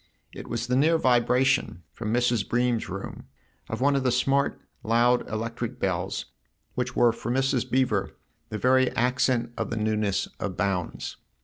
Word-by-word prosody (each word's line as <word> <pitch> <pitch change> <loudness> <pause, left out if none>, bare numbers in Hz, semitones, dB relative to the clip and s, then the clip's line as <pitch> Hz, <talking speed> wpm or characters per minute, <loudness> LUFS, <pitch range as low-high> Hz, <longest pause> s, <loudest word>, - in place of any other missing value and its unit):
It - - -9
was - - -2
the 125 +1 0
near 160 +5 +4
vibration, 125 - +2
from 110 -2 -4
Mrs. 120 -3 +1
Bream's 120 -1 +1
room, 95 +2 -7 0.4
of - - -4
one 140 +1 +3
of 135 - +2
the 130 -1 +1
smart, 135 +3 +1 0.2
loud 120 +2 +2
electric 115 +2 -4
bells - - -2 0.5
which 125 0 -3
were 120 -1 +5
for 115 - -6
Mrs. 135 -1 +1
Beever 125 -7 0 0.3
the 110 - -4
very 130 +3 +3
accent 125 0 +1
of - - -2
the 110 - -3
newness 105 -2 0
of 95 -3 -4
Bounds. 95 -4 -2
120 Hz, 155 wpm, -26 LUFS, 110-130 Hz, 0.5 s, were